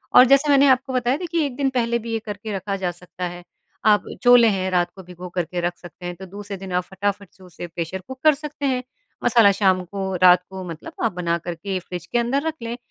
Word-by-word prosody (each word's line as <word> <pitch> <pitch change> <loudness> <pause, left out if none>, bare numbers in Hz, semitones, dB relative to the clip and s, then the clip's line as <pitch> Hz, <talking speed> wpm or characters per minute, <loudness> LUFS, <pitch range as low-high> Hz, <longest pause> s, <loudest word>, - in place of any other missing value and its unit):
और 250 - +10
जैसे 275 +3 +4
मैंने 280 0 +6
आपको 260 0 +2
बताया 250 +1 +1
देखिए 335 -2 -1
1 270 -3 -4
दिन 275 0 +1
पहले 235 -2 0
भी 230 0 -6
ये 225 - 0
करके 210 0 -5
रखा 195 +1 -3
जा 185 -2 -1
सकता 180 +1 -8
है, 175 0 -9 0.4
आप 210 -2 +4 0.2
छोले 245 -1 +7
हैं, 190 -2 -1
रात 175 -1 +1
को 190 - -11
भिगोकर 180 0 -5
के 175 +2 -4
रख 175 - -6
सकते 175 0 -12
हैं, 175 0 -4
तो 190 +2 -10
दूसरे 200 +1 -8
दिन 190 0 -8
आप 180 0 +1
फटाफट 200 +2 -3
से 190 - -19
उसे 175 -1 -9
प्रेशर 170 +2 -4
कुक 260 0 -9
कर 310 -1 +7
सकते 295 0 -6
हैं। 255 -2 0 0.4
मसाला 225 -4 +6
शाम 185 -2 +3
को, 190 +1 -4
रात 180 0 +7
को 190 -1 -7
मतलब 160 -1 -8
आप 230 - +2
बनाकर 170 0 -2
के 190 +3 -3
फ्रिज 180 0 -7
के - - -1
अंदर 265 +5 0
रख 320 - 0
लें, 230 +1 -4
195 Hz, 240 wpm, -22 LUFS, 180-245 Hz, 0.4 s, और